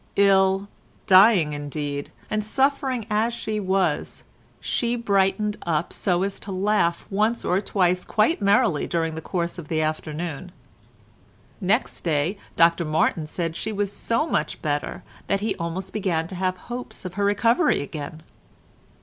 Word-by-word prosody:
Ill, 195 0 +4 0.4
dying 185 -5 +6
indeed, 145 -1 -4 0.2
and 215 0 -1
suffering 265 0 0
as 220 +2 +1
she 215 -2 -3
was, 190 -1 -1 0.4
she 240 0 0
brightened 210 -1 +1
up 165 -1 -1
so 180 -1 0
as 195 0 -3
to 200 - -7
laugh 185 -3 +1
once 215 +4 +1
or 185 +2 +2
twice 180 -3 +1
quite 220 +6 +1
merrily 200 - +3
during 165 -1 -1
the 160 - -5
course 170 +1 -3
of 160 - -9
the 160 0 -1
afternoon. 155 +2 -3 1.1
Next 205 +6 0
day 160 +3 0 0.2
Dr 170 +1 +4
Martin 155 0 +1
said 165 0 -3
she 220 - -3
was 205 -1 -2
so 230 +7 0
much 155 - -1
better 145 -1 -2 0.2
that 195 0 0
he 215 0 0
almost 175 +3 -4
began 180 -6 0
to 190 - -6
have 185 0 -1
hopes 240 +2 -7
of 180 - -5
her 200 +2 -1
recovery 230 - +3
again. 155 +2 -7
190 Hz, 150 wpm, -24 LUFS, 165-210 Hz, 1.1 s, dying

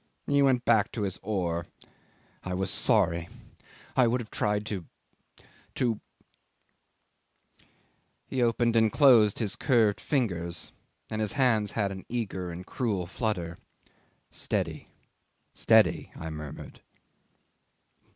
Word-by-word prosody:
He 140 0 +2
went 130 -3 +3
back 110 -4 +3
to 110 - -2
his 95 -2 -2
oar. 85 -5 -2 0.8
I 90 0 -3
was 95 +1 -1
sorry. 85 -5 +1 0.7
I 130 -2 +5
would 120 +2 +1
have 115 -3 -8
tried 105 0 0
to 100 -6 -4 0.9
to.. 115 -4 0 0.9
." - - -38
'He 130 - -2
opened 120 0 +2
and 110 -1 +4
closed 120 -8 +5
his 105 -4 -2
curved 115 -6 +2
fingers, 85 - -2 0.4
and 110 0 -2
his 105 - -1
hands 115 -7 +2
had 100 -3 0
an 95 -1 -8
eager 95 -7 -3
and 85 +2 -7
cruel 105 -8 -2
flutter. 95 -4 -3 0.7
"Steady, - - -3 0.7
steady," - - +3
I 80 0 -6
murmured. 75 -2 -8
105 Hz, 120 wpm, -28 LUFS, 90-120 Hz, 0.9 s, I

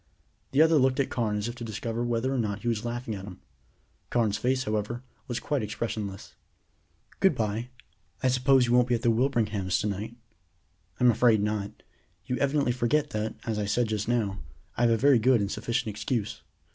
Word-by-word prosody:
The 145 +4 +5
other 160 -1 +4
looked 130 0 +2
at 140 - 0
Carne 110 -4 0
as 105 +2 -2
if 120 - -4
to 125 -1 -8
discover 115 +1 -3
whether 120 +2 0
or 130 - 0
not 105 -3 -2
he - - -3
was 115 -2 0
laughing 120 -1 -3
at 95 -2 -6
him. 95 -6 -10 0.7
Carne's 110 -4 +1
face, 130 +1 +1
however, 110 +2 -2 0.2
was 120 -1 -2
quite 145 -3 -1
expressionless. 105 -2 -4 0.9
"Good - - +4
bye; 110 +2 -2 0.5
I - - +4
suppose 130 0 +4
you 120 - 0
won't 125 0 +5
be 125 - +2
at 115 - -4
the 120 - +4
Wilbringham's 110 -6 +1
to - - -2
night?" 105 +3 -3 0.8
"I'm 125 -1 +6
afraid 110 -2 +3
not. 105 -1 -3 0.4
You 125 - -1
evidently 140 -2 +1
forget 135 +5 +1
that, 110 +1 -2
as 110 -2 -1
I 105 - -1
said 110 +3 +1
just 105 -1 -2
now, 105 -5 0 0.4
I - - -2
have 120 - +5
a 115 - +3
very 135 +1 +5
good 125 +1 +4
and 100 0 -1
sufficient 120 -1 -2
excuse." 105 +1 -3
115 Hz, 195 wpm, -27 LUFS, 105-125 Hz, 0.9 s, I'm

